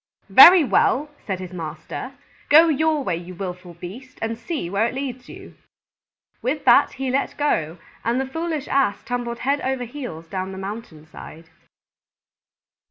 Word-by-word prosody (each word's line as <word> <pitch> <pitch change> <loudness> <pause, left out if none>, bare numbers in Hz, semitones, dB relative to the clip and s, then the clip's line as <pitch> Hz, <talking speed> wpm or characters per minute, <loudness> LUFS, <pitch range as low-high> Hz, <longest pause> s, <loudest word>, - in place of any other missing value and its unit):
"Very 355 -1 +10
well," 290 +2 +1 0.2
said 190 -3 -2
his 185 -1 -8
master, 160 - -7 0.4
"go 320 +3 +7
your 310 0 +1
way, 180 -8 -1
you 175 +1 -9
willful 180 -1 -7
beast, 210 +10 -10
and 225 0 -2
see 235 - -4
where 200 +5 +1
it 240 - -6
leads 260 -2 -5
you." - - -12 0.9
With 275 +4 -2
that 240 - +5
he 265 -1 -3
let 270 +2 -1
go, 165 - 0 0.3
and 235 +3 0
the 265 - -1
foolish 315 +1 -4
Ass 265 -7 +1
tumbled 240 -1 -3
head 280 +2 +1
over 265 -1 -2
heels 240 - -8
down 190 +1 -4
the - - -8
mountain 195 -5 -8
side. 160 +1 -13
240 Hz, 160 wpm, -22 LUFS, 180-275 Hz, 0.9 s, Very